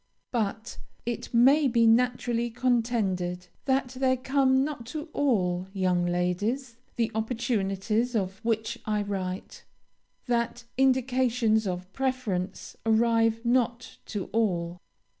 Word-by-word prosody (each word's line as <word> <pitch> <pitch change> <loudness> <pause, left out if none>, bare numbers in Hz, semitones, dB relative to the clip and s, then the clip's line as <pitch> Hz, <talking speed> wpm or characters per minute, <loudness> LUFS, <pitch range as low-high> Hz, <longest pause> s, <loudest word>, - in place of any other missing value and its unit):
"But, 220 -2 -2 0.3
it 240 0 -4
may 270 +5 +5
be 235 -2 +3
naturally 240 0 +2
contended, 220 -8 0 0.2
that 265 -1 +1
there 260 0 +1
come 265 0 +2
not 275 -6 -5
to 305 +4 -6
all 185 -10 +1
young 180 -2 +1
ladies 205 +9 -1 0.2
the 230 -2 0
opportunities 220 0 -1
of 195 -2 -1
which 225 -1 -1
I 210 -1 +1
write; 190 -2 -5 0.6
that 240 -1 -1
indications 250 -4 +2
of 180 +1 -5
preference 225 -8 -2
arrive 225 0 +2
not 240 0 0
to 205 -4 -3
all. 180 -6 0
230 Hz, 110 wpm, -27 LUFS, 195-250 Hz, 0.6 s, may